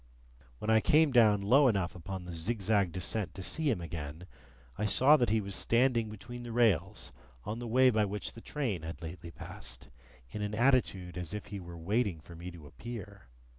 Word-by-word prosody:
When 110 - -1
I 110 - +6
came 150 +5 +4
down 110 -5 +5
low 135 +7 +5
enough 95 -6 +1
upon 90 +1 -7
the 90 - -7
zigzag 100 +1 +1
descent 90 +4 -2
to 95 - -6
see 145 - 0
him 115 - +1
again, 80 0 -6 0.5
I 105 - -2
saw 130 +9 +6
that 125 -5 +2
he 110 +1 +3
was 100 -1 -5
standing 115 +1 +2
between 120 +3 -8
the 120 -1 -7
rails 105 -5 +1 0.3
on 110 +3 -4
the 120 - -5
way 130 +3 +5
by 110 -2 +2
which 105 +1 -4
the 115 - -11
train 120 - -2
had 80 0 -7
lately 85 +1 -7
passed, 65 -6 -10 0.4
in 105 - -5
an 105 0 -2
attitude 105 -8 +1
as 90 +2 -5
if 105 - -5
he 100 - -4
were 85 -2 -9
waiting 100 +1 0
for 85 +2 -13
me 85 +2 -7
to 85 -4 -12
appear. 100 - -9
100 Hz, 200 wpm, -31 LUFS, 85-115 Hz, 0.5 s, I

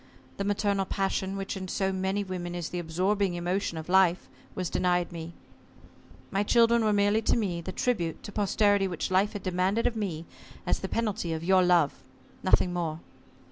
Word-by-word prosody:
The 200 - -2
maternal 200 -1 0
passion, 195 0 -1
which 195 0 -4
in 190 -1 -5
so 190 +1 0
many 190 +2 -1
women 180 -2 -5
is 175 -2 -4
the 175 - -4
absorbing 185 +3 0
emotion 175 0 -2
of 160 - -6
life, 185 -1 +3 0.3
was 185 -1 -2
denied 180 0 0
me. 165 0 -7 1.0
My 195 - +1
children 235 +2 +4
were 215 - +2
to - - +2
me - - +2 0.4
merely 185 -7 -1
the 185 - -6
tribute 180 -7 -1
to 205 - -7
posterity 205 -1 +2
which 180 0 -3
Life 195 +4 +2
had 205 - -6
demanded 185 +4 0
of 235 - +1
me 175 -7 -3 0.4
as - - 0
the - - -5
penalty 210 -7 -1
of 160 0 -4
your 190 +1 +4
love 175 -5 +3 0.4
nothing 185 -1 +3
more. 165 -3 -2
190 Hz, 180 wpm, -28 LUFS, 175-200 Hz, 1.0 s, children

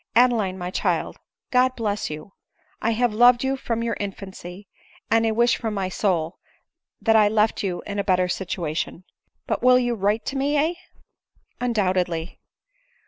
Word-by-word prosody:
Adeline, 225 -6 +3
my 180 0 -5
child, - - -1 0.3
God 255 0 +3
bless 210 -2 -2
you! 155 +5 -8 0.5
I 230 - +1
have 240 0 +1
loved 240 +2 +5
you 265 0 +1
from 230 -3 -3
your 230 -2 -1
infancy, 195 -1 -7 0.4
and 225 0 +4
I - - +3
wish 235 +2 +3
from 220 -2 -3
my 190 -2 -1
soul, 175 -4 -1 0.6
that 225 -1 +3
I 215 -1 +6
left 215 +1 +2
you 185 -3 -3
in 205 0 -4
a - - +1
better. 185 -2 +2
situation. 175 -2 -3 0.4
But - - -2
you 250 - +2
will 250 -2 +4
write 210 +3 +1
to 275 - -3
me, 275 +2 0
heh 310 +4 +2 0.4
?" - - -59
" - - -28
Undoubtedly." 185 -7 0
210 Hz, 170 wpm, -23 LUFS, 185-240 Hz, 0.6 s, I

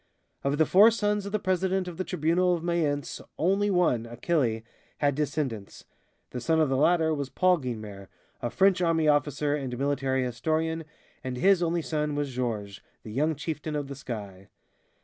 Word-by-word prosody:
Of 140 +1 0
the 160 - +4
four 205 +7 +7
sons 210 -2 -1
of - - -6
the 215 - +1
president 185 -1 0
of 175 -2 -7
the 185 - -1
Tribunal 180 +1 +1
of 165 - -6
Mayence, 155 -5 -1 0.2
only 195 +5 +2
one, 165 - +2
Achille, 120 -2 -1 0.3
had 145 -1 +2
descendants. 135 -8 -3 0.5
The 125 - -5
son 160 +4 +2
of 155 -3 +3
the 135 - +1
latter 160 +3 +3
was 140 -3 -3
Paul 185 +2 +3
Guynemer, 110 -7 -6 0.3
a 120 - -1
French 190 +4 +3
army 165 -2 +2
officer 145 0 +2
and 135 -4 -3
military 135 -1 0
historian, 160 +6 -1 0.4
and 130 -1 -4
his 190 +4 +4
only 170 -1 0
son 150 -2 -2
was 145 -2 -2
Georges, 110 -5 -3 0.2
the 110 - -8
young 150 +7 +1
chieftain 150 +1 -4
of 145 -2 -3
the 140 - -6
sky. 100 -7 -7
150 Hz, 175 wpm, -27 LUFS, 130-175 Hz, 0.5 s, four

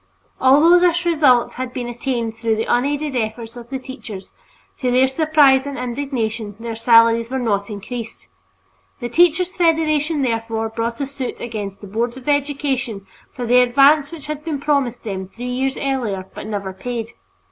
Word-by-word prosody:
Although 295 +7 +6
this 350 0 +2
result 290 -8 +3
had 255 0 -5
been 245 -1 -4
attained 240 -1 -3
through 225 0 -1
the 220 - -2
unaided 285 +3 0
efforts 225 0 -3
of 240 -1 -10
the 270 - -3
teachers, 255 -7 -9 0.5
to 255 - 0
their 255 +2 +4
surprise 285 -2 +4
and 280 - -5
indignation 235 -4 -3
their 230 0 -5
salaries 230 0 +4
were 265 - -2
not 205 -5 -1
increased. 220 - -7 0.7
The 240 - -4
Teachers' 350 +5 +3
Federation, 315 -3 +2
therefore, 225 -2 -1
brought 230 +2 -3
a - - 0
suit 270 -2 -5
against 210 -4 -6
the 205 - -9
Board 235 +5 -2
of 260 - -12
Education 275 -7 -1 0.3
for 245 - -5
the 250 +2 +5
advance 275 +4 +4
which 325 -5 -9
had 300 0 -5
been 305 -3 -3
promised 280 -5 0
them 190 -4 -4
three 235 +6 -9
years 260 +2 -1
earlier 235 -9 -2
but - - -8
never 200 -3 -4
paid. 230 +3 -5
250 Hz, 170 wpm, -20 LUFS, 225-285 Hz, 0.7 s, Although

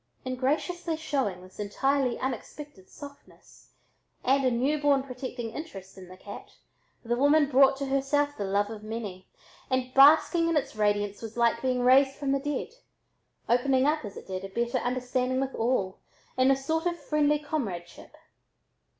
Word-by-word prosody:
In 255 0 -2
graciously 320 +6 -1
showing 265 - -2
this 185 +2 -16
entirely 255 +5 0
unexpected 260 -4 -6
softness, 285 -1 -14 0.5
and 270 +2 +2
a 255 - +3
new 265 +5 0
born 280 -2 +3
protecting 250 -3 -6
interest 195 - -9
in 185 -1 -12
the 185 +1 -13
cat, 200 +2 -11 0.5
the 240 +1 0
woman 285 +3 +4
brought 270 0 +5
to 275 - -3
herself 275 +2 0
the 205 - -4
love 200 +2 0
of 215 -2 -8
many, 215 -4 -6 0.4
and 255 -1 -1
basking 320 +4 +6
in 330 - +2
its 285 - -2
radiance 205 -1 0
was 225 0 -8
like 235 -1 +2
being 255 -1 0
raised 265 +2 +5
from 280 -1 -2
the 275 - +1
dead, 290 -1 -3 0.8
opening 260 +2 +2
up 305 0 +1
as 205 -3 -8
it - - -10
did 185 0 -5
a 195 - -6
better 235 +5 -1
understanding 250 +1 -1
with 270 0 -2
all 225 -5 -1 0.4
in 255 +1 +3
a 270 - +5
sort 320 +5 -1
of 345 -1 -2
friendly 300 -1 +1
comradeship. 225 - -5
260 Hz, 165 wpm, -27 LUFS, 225-285 Hz, 0.8 s, basking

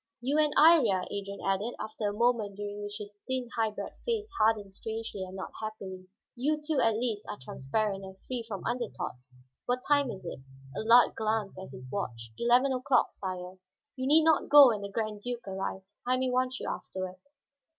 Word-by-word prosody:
"You 275 +5 +1
and 300 -1 +4
Iría," 280 - +6
Adrian 200 0 -5
added, 195 +5 0
after 215 -1 -3
a - - -4
moment 225 -3 +1
during 205 0 -5
which 205 0 -5
his 205 -1 -10
thin, 260 -2 -2
high 225 -1 +2
bred 210 - -6
face 450 -3 -1
hardened 215 -3 +2
strangely 220 -2 -5
and 185 0 -8
not 190 - -6
happily, 190 -4 -6 0.3
"you 295 +5 +1
two 300 -1 -1
at 225 -1 +3
least 225 -3 -2
are - - -4
transparent, 195 +10 -2
and 190 0 -10
free 250 -2 -3
from 200 -4 -6
under 240 -3 -1
thoughts. 125 0 -7 0.3
What 250 +1 0
time 285 -2 +4
is 190 -5 -7
it?" 170 - -5 0.4
Allard 235 +2 +6
glanced 215 -3 -1
at 190 - -8
his 130 -1 -10
watch. 115 - -4
"Eleven 250 +3 +4
o'clock, 255 0 +2
sire." 185 -1 -6 0.4
"You 260 0 -2
need 310 +3 +7
not 320 -1 +3
go 290 -3 +10
when 215 -3 -1
the 200 - -5
Grand 215 0 -3
Duke 240 -1 -4
arrives; 190 +1 -5
I 255 +1 +2
may 255 0 0
want 255 +1 0
you - - -5
afterward. 185 -1 -5
215 Hz, 190 wpm, -30 LUFS, 195-250 Hz, 0.4 s, go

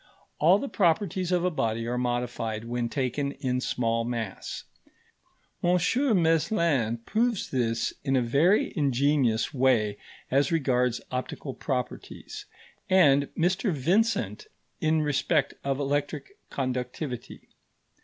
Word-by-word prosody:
All 170 +6 +6
the 275 - -4
properties 185 - +1
of 180 -1 +2
a 180 - +2
body 115 -6 -1
are 120 +1 -2
modified 120 -3 -2
when 120 0 -2
taken 140 +2 -2
in 125 -1 -2
small 115 -2 0
mass; 115 -4 -4 1.0
M. 180 +1 +4 0.5
Meslin 160 - +2
proves 230 0 0
this 115 -3 0
in 135 -1 +1
a 130 - +3
very 150 - +3
ingenious 140 -4 +1
way 120 -6 +2 0.3
as 140 +2 +2
regards 125 -6 +1
optical 130 +2 -4
properties, 125 -3 -5 0.4
and 145 -7 +5
Mr 185 +5 +1
Vincent 200 - 0 0.3
in 155 -2 +2
respect 145 0 +1
of 135 0 -1
electric 145 - -2 0.2
conductivity. 130 0 -4
135 Hz, 115 wpm, -27 LUFS, 125-165 Hz, 1.0 s, All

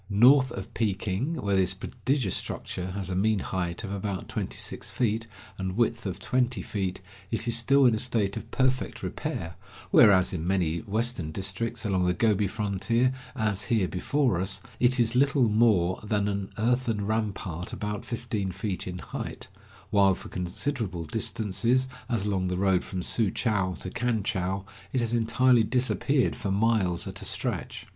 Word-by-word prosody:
North 130 +6 +6
of 95 - -7
Peking, 105 - -1
where 100 -9 0
this 95 0 +2
prodigious 125 +1 -1
structure 90 0 -3
has 95 -1 -4
a - - -1
mean 105 +3 +2
height 90 0 -3
of 100 - -5
about 100 -1 -3
twenty - - -3
six - - 0
feet, 115 -1 0 0.3
and 95 +1 -3
width 115 -2 +1
of 90 -2 -3
twenty 125 +3 0
feet, 95 -3 -3 0.3
it 115 - -2
is 120 - +4
still 135 +4 +4
in 120 - +6
a 110 - 0
state 110 -5 +1
of - - -7
perfect 130 0 0
repair, 85 +1 -4 0.4
whereas 95 -3 +6
in 85 -2 -3
many 85 -3 +1
western 110 -5 -1
districts 105 +7 -2
along 95 -3 +1
the 90 - +1
Gobi 105 0 +2
frontier, 110 +5 0 0.2
as 105 -4 -1
here 105 -3 +2
before 115 +1 0
us, 95 +1 -1 0.2
it 125 +1 +3
is 115 0 +2
little 140 -1 +4
more 105 -5 +3
than 105 -1 0
an 100 -1 -2
earthen 115 -2 +1
rampart 100 -5 -2
about 105 0 -4
fifteen 115 -5 -3
feet 95 +1 -4
in 90 0 -4
height, 85 - -6 0.4
while 100 -2 +5
for - - -10
considerable 95 - -3
distances, 115 +10 0 0.2
as 115 -5 0
along 95 -3 0
the 90 0 -1
road 95 -1 +2
from 95 -2 -5
Su 110 +1 +1
chou 95 -4 0
to - - -6
Kan 120 -4 0
chou, 95 -3 -2 0.3
it 130 - +2
has 115 -1 -1
entirely 120 +1 +4
disappeared 130 +3 +1
for 100 - -4
miles 100 -4 +1
at - - -7
a - - -7
stretch. - - -4
105 Hz, 170 wpm, -27 LUFS, 95-120 Hz, 0.4 s, North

